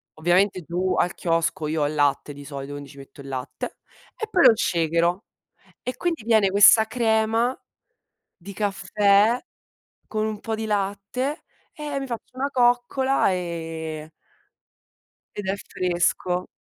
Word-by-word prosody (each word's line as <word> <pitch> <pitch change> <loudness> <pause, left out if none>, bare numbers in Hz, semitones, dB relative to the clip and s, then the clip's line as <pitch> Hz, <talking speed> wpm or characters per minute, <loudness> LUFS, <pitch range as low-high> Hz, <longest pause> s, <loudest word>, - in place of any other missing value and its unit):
Ovviamente 180 +4 +2
giù 175 +4 -1
al 175 - +1
chiosco 165 -2 0
io 155 0 -1
ho 145 - +2
il 155 - -4
latte 145 0 +1
di 145 0 -11
solito, 140 0 -7
quindi 145 -1 -8
ci 140 - -15
metto 135 +1 -13
il 140 - -11
latte 130 0 -5 0.4
e 440 - -4
poi 365 -5 +4
lo - - +10
shakero. 170 +1 +1 0.6
E 250 - -4
quindi 335 -9 -2
viene 220 -4 +4
questa 205 +3 +7
crema 225 +1 +1 0.8
di 200 +2 -10
caffè, 205 +3 +2 0.7
con 215 -1 -1
un 215 -1 -3
po' 225 - -3
di 220 0 -4
latte, 205 +7 -2 0.3
e 295 -3 -4
mi 270 - -4
faccio 240 +1 -7
una 275 +2 -1
coccola 245 0 +2
ehm 160 -3 -5 1.3
ed 205 - -5
è 190 +1 0
fresco. 180 -1 -1
195 Hz, 145 wpm, -24 LUFS, 165-225 Hz, 1.3 s, lo